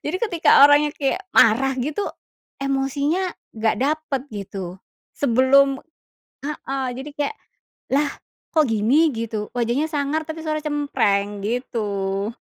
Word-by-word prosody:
jadi 310 +5 -1
ketika 345 -6 +4
orangnya 290 +1 +4
kayak 290 +7 -1
marah 255 +5 +5
gitu, 300 +10 -2 0.6
emosinya 280 +6 0 0.2
nggak 220 0 +1
dapet, 295 -1 -1
gitu, 195 -3 -6 0.4
sebelum 270 +1 +4 0.6
heeh, 275 -2 -3
jadi 265 +4 -7
kayak, 295 +9 -1 0.6
"Lah, 285 +1 +2 0.4
kok 310 -2 +4
gini", 235 +10 +3
gitu, 220 -2 -3
wajahnya 245 +5 +1
sangar 295 +1 -1
tapi 315 0 -5
suara 310 0 -1
cempreng, 210 -9 0
gitu. 205 -4 -2
275 Hz, 115 wpm, -22 LUFS, 225-295 Hz, 0.6 s, marah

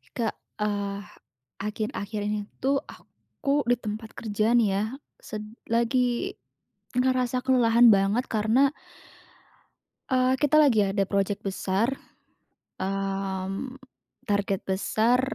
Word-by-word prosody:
Kak, 225 -4 -1 0.2
eee, 200 -1 -1 0.6
akhir-akhir 210 0 -3
ini 210 0 -1 0.2
tuh 275 +1 +1
aku 285 +1 -4
di 245 +1 +2
tempat 215 0 -5
kerja 215 0 -1
nih 235 -3 +4
ya, 200 - +1 0.4
sed 215 -1 -6 0.3
lagi 245 - +1 0.6
ngerasa 255 0 +1
kelelahan 245 -2 +5
banget 205 +4 +3
karena, 225 +5 +3 1.4
eee, 255 -1 +3
kita 295 +1 +3
lagi 235 -10 +5
ada 195 0 +1
project 200 +1 -1
besar, 195 +4 0 0.9
mmm, 195 +4 -3 0.5
target 200 -2 0
besar 220 +5 +2
220 Hz, 100 wpm, -26 LUFS, 200-250 Hz, 1.4 s, kelelahan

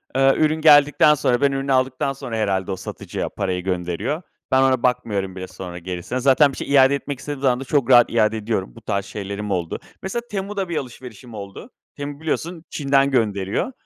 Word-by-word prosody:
Eee, 135 0 +5
ürün 155 0 +1
geldikten 150 0 +6
sonra, 125 -4 +1
ben 140 -1 +3
ürünü 135 0 -2
aldıktan 130 +1 +1
sonra 120 -4 -6
herhalde, 95 -3 -1
o - - -1
satıcıya - - -5
parayı 90 -2 -3
gönderiyor. 95 - -2 0.3
Ben, 130 0 +4
ona 130 -2 +2
bakmıyorum 105 -7 0
bile 95 0 -6
sonra 90 -1 -8
gerisine. 90 +7 -4
Zaten 140 +2 +4
bir - - -10
şey - - -5
iade 135 0 +6
etmek 140 -1 -5
istediğim 145 0 -6
zaman 130 -2 +2
da, - - -5
çok 135 -2 0
rahat 120 -2 +7
iade 110 -1 +2
ediyorum. 105 - -3
Bu - - -13
tarz 100 0 -2
şeylerim 100 0 -5
oldu. 90 -3 -2 0.2
Mesela 215 +5 -3
Temu'da 195 -1 -3
bir 170 - -2
alışverişim 125 -2 -8
oldu. 100 -2 -9 0.3
Temu 145 0 -6
biliyorsun 160 +1 -3
Çin'den 140 -1 +2
gönderiyor. 105 - 0
130 Hz, 190 wpm, -21 LUFS, 100-140 Hz, 0.3 s, rahat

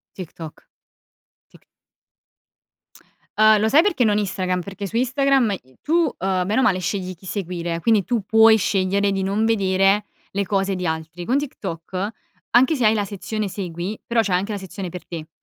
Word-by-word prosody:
TikTok, 165 -3 -10 0.8
Tik - - -21 1.7
Uhm, 215 -1 +6
lo 220 - +2
sai 285 +7 +6
perché 340 -11 +1
non 210 -1 +2
Instagram? 185 -2 -1
Perché 200 +2 -6
su 225 - -5
Instagram 260 -2 +2
i 130 0 -25
tu, 305 - -4
uhm, 195 - +1
bene 215 +5 0
o - - +4
male 195 -8 +3
scegli 185 0 -3
chi 180 - -22
seguire, 175 -3 -4
quindi 220 -2 +3
tu 220 +3 -1
puoi 220 0 +6
scegliere 200 0 +1
di 195 -1 -1
non 205 +3 0
vedere 195 -1 +2 0.3
le 200 +1 -1
cose 195 0 0
di 180 -1 -3
altri. 160 +2 -4
Con 255 +7 +1
TikTok, 190 - -4 0.4
anche 255 +6 +4
se 250 -5 -1
hai 215 - +6
la 205 -2 0
sezione 210 +1 -4
segui, 185 +1 -5
però 235 -1 +2
c'è 195 -4 0
anche 200 +4 0
la 205 - -3
sezione 190 -1 -7
per 180 +1 -9
te, 160 -2 -7
200 Hz, 180 wpm, -22 LUFS, 185-220 Hz, 1.7 s, Uhm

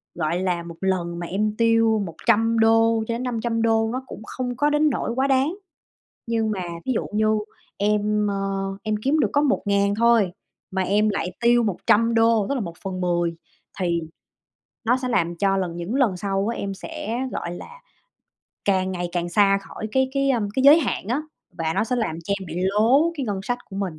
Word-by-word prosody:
gọi 170 +1 -1
là, 180 -2 -1
một 170 0 -9
lần 175 -3 -1
mà 175 - -5
em 210 +4 -1
tiêu 225 -1 +3
$100-$500, 225 +2 +1
nó 260 +1 -3
cũng - - -9 0.2
hông 250 -1 -2
có 290 +4 +2
đến 295 +1 +3
nỗi 240 - -2
quá 265 +2 +1
đáng. 275 +6 +1 0.7
Nhưng 225 -1 0
mà, 195 -3 -3 0.2
ví 260 - 0
dụ - - -1
như, 215 +1 +2 0.5
em, 210 +1 +1
ơ, 200 - -1 0.5
em 215 -1 -1
kiếm 290 +4 +2
được - - +2
có 285 - +3
1000 200 -8 +1
thôi, 230 -4 +3 0.4
mà 190 0 -1
em 210 +3 +2
lại 195 -3 -2
tiêu 240 0 +4
$100, 225 +2 +2
tức 280 - 0
là 255 - -1
1/10 175 -1 -2 0.4
thì 170 -2 0 0.8
nó 240 +3 +3
sẽ 255 -1 -4
làm 170 -8 0
cho 195 +1 +1
lần 180 -3 -2
những 175 +7 -4
lần 250 -9 +2
sau 195 +2 -1
á, 235 - -2
em 195 -1 -4
sẽ, 225 +4 -5
gọi 170 0 -4
là, 475 - -11 0.8
càng 190 -1 +1
ngày 175 -1 -3
càng 175 -1 -1
xa 195 +1 +4
khỏi 215 - -7
cái 265 0 +2
cái, 275 0 +1
ơm, 225 -6 0
cái 265 - +1
giới 290 +3 +9
hạn 250 -8 -2
á, 260 +6 0 0.4
và 160 -1 0
nó - - +1
sẽ 250 +2 -1
làm 220 -9 -1
cho 200 - -1
em 190 - -7
bị 165 - -7
lố 235 - +3
cái 275 -4 -3
ngân 200 -3 -2
sách 245 +5 -2
của 195 - -7
mình. 185 -6 -3
215 Hz, 190 wpm, -23 LUFS, 190-235 Hz, 0.8 s, giới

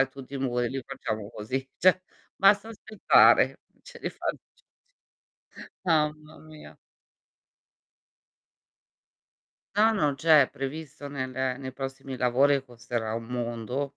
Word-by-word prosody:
e 135 - +3
tutti 135 0 -11
i - - -3
muri 125 -2 -1
li 135 +1 -5
facciamo 110 -1 -5
così. 130 +6 -4
Cioè, 185 +1 +4 0.3
basta 200 +3 +4
aspettare, 220 -1 +4 0.2
ce - - -13
li - - -4
fa - - -9
c - - -11 1.3
c - - -17
mamma 155 -2 0
mia. 155 -1 -14 3.0
No, 220 +2 +5
no, 150 -9 +1
c'è, 155 -1 +6
è - - -3
previsto 145 +1 -7
nel 130 -2 -5
ehm, 130 0 -2
nei 130 -1 -6
prossimi 135 0 -6
lavori 130 +4 +3
e 135 - -2
costerà 120 -3 -4
un 115 0 -4
mondo. 120 +3 -3
135 Hz, 135 wpm, -27 LUFS, 125-155 Hz, 3.0 s, c'è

